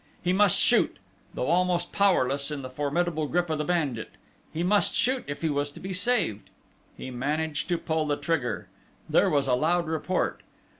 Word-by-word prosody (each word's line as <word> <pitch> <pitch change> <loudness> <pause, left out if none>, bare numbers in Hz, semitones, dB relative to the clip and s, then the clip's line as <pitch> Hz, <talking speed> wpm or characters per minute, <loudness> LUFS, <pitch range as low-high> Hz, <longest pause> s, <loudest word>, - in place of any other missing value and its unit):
He 180 +1 +2
must 200 -1 +4
shoot, - - +3 0.4
though - - -1
almost 175 +3 +1
powerless 140 -9 +2
in 145 -3 -4
the 130 - -7
formidable 155 +3 -1
grip 175 +1 0
of 155 - -1
the - - 0
bandit. 150 -9 -1 0.4
He 165 - -2
must 205 +3 +2
shoot 260 +1 +1
if 145 +3 -6
he 160 - +2
was 145 0 -1
to 145 - -13
be 190 +1 -5
saved. 185 - 0 0.5
He 130 - -7
managed 150 +4 -2
to 175 - +1
pull 160 -1 -1
the 145 -1 0
trigger. 160 -8 -2 0.4
There - - +3
was 140 -2 +2
a 130 - +2
loud 170 +7 +2
report. 160 +3 -1
160 Hz, 185 wpm, -27 LUFS, 145-175 Hz, 0.5 s, must